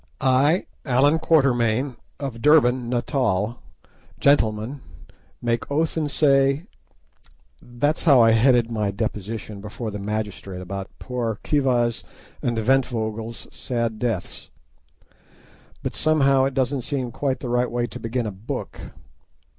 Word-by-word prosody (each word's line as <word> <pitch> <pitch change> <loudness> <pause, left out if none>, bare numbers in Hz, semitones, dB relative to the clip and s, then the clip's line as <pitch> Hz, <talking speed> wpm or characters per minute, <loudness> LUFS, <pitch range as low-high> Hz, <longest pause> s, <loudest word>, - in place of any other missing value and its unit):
I, 140 +7 +3 0.2
Allan 140 +4 +3
Quatermain, 130 -5 +2 0.2
of 135 -5 -5
Durban, 130 -5 +4
Natal, 120 -3 0 0.6
Gentleman, 120 -1 +2 0.6
make 115 -1 -1
oath 155 +3 0
and 155 -2 -1 1.6
say—That's 145 +8 -1
how 140 -6 +7
I 115 -1 +6
headed 120 0 +4
my 105 -3 0
deposition 105 0 -4
before 105 +2 -6
the 105 - -5
magistrate 100 -2 -4
about 95 +1 -6
poor 120 -4 -3
Khiva's 125 -5 +1 0.4
and 120 -1 -1
Ventvögel's 115 -2 -1
sad 115 -3 -2
deaths; 115 -6 -3 1.3
but - - -3
somehow 140 -4 +3
it 135 -1 -2
doesn't 135 0 0
seem 130 -2 -3
quite 135 +1 -2
the 125 - -5
right 125 +1 +1
way 120 0 -1
to 115 - -8
begin 115 +1 -2
a 105 - -3
book. 95 +3 -6
120 Hz, 120 wpm, -23 LUFS, 110-135 Hz, 1.6 s, how